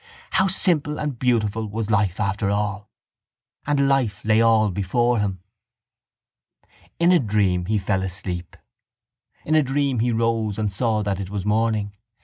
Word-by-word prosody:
How 190 - +3
simple 155 -6 +1
and 145 -5 -4
beautiful 110 -3 0
was 110 +1 -4
life 100 -3 +1
after 100 0 -1
all! 105 0 -2 0.8
And 140 -2 +2
life 130 -9 0
lay 110 +1 +4
all 110 -2 +3
before 115 +6 0
him. 95 -3 -3 1.5
In 170 +1 +3
a 180 - +5
dream 100 -6 0
he 110 +1 +1
fell 95 -1 -1
asleep. 90 -2 -5 0.9
In 155 - 0
a 155 - +5
dream 135 -2 0
he 120 +2 +1
rose 115 -2 0
and 105 -2 -2
saw 110 0 0
that 100 -2 -2
it 95 -2 -5
was 100 -1 -4
morning. 105 -1 0
110 Hz, 150 wpm, -22 LUFS, 100-120 Hz, 1.5 s, a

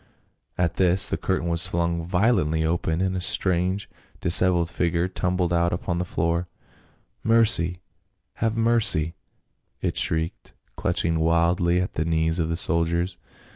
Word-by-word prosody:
At 85 -2 -1
this 90 -1 +4
the - - -2
curtain 85 - -2
w^as 85 0 +3
flung 85 0 -1
violently 90 -4 +1
aside 80 +1 -1
and 95 0 -1
a 90 - -3
strange 95 +2 0 0.3
disheveled 85 -1 +3
figure 85 0 0
tumbled 90 -1 -1
out 85 0 +1
upon 85 0 -3
the 90 - -2
floor. 85 +1 -1 0.4
" - - -39
Mercy! 90 -6 +3 0.6
have 115 0 0
mercy 110 -9 +2 0.3
!" - - -48
it - - -2
shrieked, 80 +1 -2 0.2
clutching 80 -1 -1
wildly 85 +2 +2
at 90 - -3
the 80 - -1
knees 80 +1 0
of 80 -1 -1
the 85 - -2
soldiers. 85 +1 +1
85 Hz, 145 wpm, -24 LUFS, 85-90 Hz, 0.6 s, this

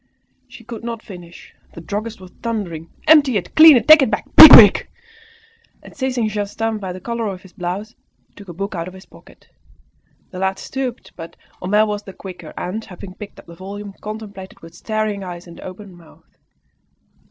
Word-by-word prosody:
She 235 - -15
could 230 0 -10
not 230 -1 -6
finish, 175 -4 -13 0.2
the - - -10
druggist 210 +6 -6
was 185 -1 -14
thundering 180 -9 -5 0.2
"Empty 290 -7 +5
it! 185 - -6
Clean 315 -3 +9
it! - - -3
Take 310 0 +8
it 265 - +1
back! - - -3
Be - - +12
quick!" - - +8 0.9
And - - -15
seizing 255 -4 -2
Justin 215 +1 -4
by 190 -2 -6
the 180 - -8
collar 235 +3 -4
of 190 -2 -7
his 190 - -17
blouse, 190 +5 -6 0.3
he - - -40
shook 200 -2 -14
a - - -8
book 195 +4 -5
out 170 -2 -5
of 185 - -11
his 190 - -14
pocket. - - -20 0.8
The 185 - -8
lad 190 0 -1
stooped, 260 -2 -6
but 165 0 -11 0.3
Homais 210 +4 +2
was 210 -1 -4
the 195 -2 -12
quicker, 180 -5 -11
and, 200 +5 -5
having 185 -1 -11
picked 205 +1 -12
up - - -15
the 170 - -14
volume, 200 +3 -9
contemplated 210 -3 -9
it - - -25
with 165 0 -13
staring 215 +1 -4
eyes 175 -1 -9
and 170 -1 -14
open 190 0 -11
mouth. 170 -2 -20
200 Hz, 195 wpm, -19 LUFS, 180-225 Hz, 0.9 s, Be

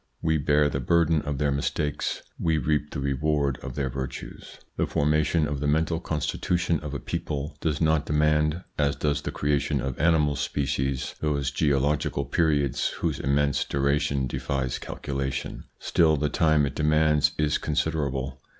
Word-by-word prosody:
We 80 -1 +2
bear 75 +1 +3
the 70 - -2
burden 80 +3 +2
of 75 -2 -3
their 75 0 +1
mistakes, 70 +1 -2 0.2
we 80 -2 +1
reap 75 -1 0
the - - -5
reward 70 0 0
of - - -7
their 70 -2 -1
virtues. 65 0 -7 0.2
The - - 0
formation 75 +1 +2
of 75 -1 -3
the 75 - -1
mental 80 +2 +1
constitution 85 +2 -1
of 75 -2 -6
a - - -2
people 75 +4 -4
does 75 -3 0
not 80 -2 +2
demand, 75 +2 +2 0.2
as 70 0 +2
does 70 0 0
the - - -4
creation 70 0 0
of 65 0 -4
animal 75 -2 +3
species, 70 -2 -1
those 70 -3 0
geological 70 -1 +1
periods 75 -5 +1
whose - - -2
immense 70 +1 +1
duration 70 -1 0
defies 65 0 -2
calculation. 70 -1 -4
Still, 80 -2 +3
the 75 +1 0
time 80 -2 +3
it 70 - -3
demands 75 0 +3
is 75 -1 +1
considerable. 70 -4 -2
75 Hz, 155 wpm, -26 LUFS, 70-75 Hz, 0.2 s, bear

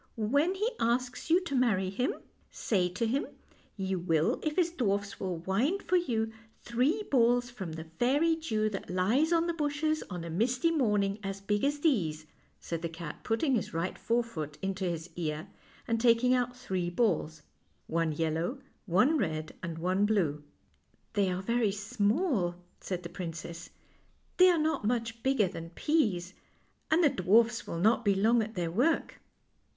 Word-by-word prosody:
" - - -40
When 285 - +2
he 430 +5 0
asks 245 +4 -1
you 345 +3 +5
to 340 - -5
marry 210 -8 +2
him, 250 +7 -1 0.3
say 185 -5 0
to 185 +6 -2
him 265 +6 0 0.5
you 190 -1 -1
will 165 -2 +1
if 305 -1 -2
his 345 -2 +2
dwarfs 200 - -1
will 185 -3 -2
wind 215 - 0
for 370 - +1
you 225 -11 +1 0.3
three 265 - +1
balls 245 -1 +3
from 190 -9 -6
the 160 0 -6
fairy 265 - +1
dew 220 -10 -1
that 195 - -6
lies 220 - +2
on 335 0 +3
the 340 - 0
bushes 310 0 0
on 180 -3 -5
a 170 - -6
misty 250 - +1
morning 210 -9 +1
as 195 -1 -4
big 205 +1 -1
as 290 +1 0
these," 165 - +1 0.3
said 165 -1 -4
the 170 - -3
cat, 165 -2 -7
putting 260 +5 +1
his 215 -8 -1
right 165 +3 -1
forefoot 230 -11 -2
into 190 0 -2
his 170 -2 -3
ear 155 +1 -3 0.4
and 230 -1 0
taking 245 +1 +4
out 250 0 0
three 185 -8 -2
balls 165 -6 0 0.4
one 165 -1 0
yellow, 165 - -1 0.3
one 225 - +3
red, 155 -6 -2
and 170 -2 -5
one 185 +4 +1
blue. 165 -9 0 0.3
" - - -40
They 200 -3 +2
are 185 +1 -2
very 230 0 +1
small," 210 - 0 0.2
said 180 -2 -4
the 170 - -6
prin 175 -1 -5
cess. 170 +1 -8 0.3
" - - -39
They 370 0 +8
are 350 - +4
not 310 -4 0
much 230 0 -1
bigger 265 -6 +2
than 165 -1 -7
peas, 185 - 0 0.6
and 320 +3 +4
the 295 - +6
dwarfs 225 +4 +3
will 170 - -4
not 220 +6 +3
be 200 -2 +3
long 225 +4 +3
at 220 +1 -5
their 170 -3 -2
work." 260 - 0
215 Hz, 175 wpm, -30 LUFS, 180-255 Hz, 0.6 s, They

